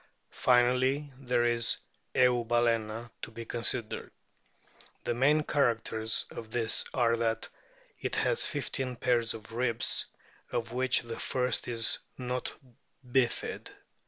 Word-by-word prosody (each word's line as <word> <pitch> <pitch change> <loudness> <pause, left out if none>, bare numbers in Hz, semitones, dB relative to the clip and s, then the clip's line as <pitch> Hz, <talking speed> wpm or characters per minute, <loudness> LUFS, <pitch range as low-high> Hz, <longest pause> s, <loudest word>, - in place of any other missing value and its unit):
Finally, 130 +3 +2
there 125 -2 +1
is 115 -1 +3 0.4
Eubalcena 120 -2 +2
to - - -5
be 115 +1 -8
considered. 115 0 -1 0.9
The - - 0
main 145 +5 +3
characters 115 -6 +1
of 110 - -8
this 115 -1 +2
are 120 -3 +2
that 115 -1 -1 0.5
it - - -3
has - - +2
fifteen 130 -2 -2
pairs 120 -2 +2
of 110 0 -11
ribs, 115 -1 +1 0.4
of 115 -1 -2
which 130 0 +3
the 115 -1 -6
first 125 0 0
is 115 -2 0 0.2
not 125 0 -2 0.6
bifid. 125 -1 0
120 Hz, 115 wpm, -30 LUFS, 115-125 Hz, 0.9 s, is